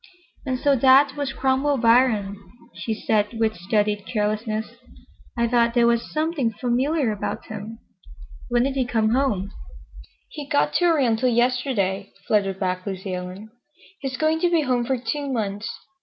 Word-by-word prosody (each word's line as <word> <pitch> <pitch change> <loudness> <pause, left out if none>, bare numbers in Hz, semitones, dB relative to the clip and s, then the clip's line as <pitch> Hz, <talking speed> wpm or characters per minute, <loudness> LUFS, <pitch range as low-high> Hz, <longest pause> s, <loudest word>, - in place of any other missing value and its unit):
"And 255 -1 0
so 280 +2 +2
that 270 +2 +5
was 285 -2 -2
Cromwell 270 +2 +1
Biron," 230 -4 +3 0.4
she 225 - -5
said 215 +1 0
with 220 -1 +1
studied 205 +3 -1
carelessness. 215 0 -1 0.7
"I 235 0 +2
thought 235 0 +2
there 240 -1 +4
was 235 0 +1
something 310 -6 0
familiar 255 +4 0
about 210 - -4
him. 225 +3 -8 0.7
When 240 0 +2
did 270 +1 0
he 265 -1 +1
come 225 -2 +1
home?" 220 -6 0 0.8
"He 295 -2 -8
got 285 0 +1
to 350 - +2
Oriental 255 -7 +2
yesterday," 240 -5 0
fluttered 195 -3 +1
back 185 -1 -2
Lucy 190 -1 -4
Ellen. 185 +4 -7 0.5
"He's 265 -4 -4
going 315 +2 +1
to 350 - +2
be 335 -2 +3
home 250 -4 0
for 265 +1 0
two 280 +3 -3
months. 210 -3 -3
235 Hz, 155 wpm, -23 LUFS, 210-270 Hz, 0.8 s, that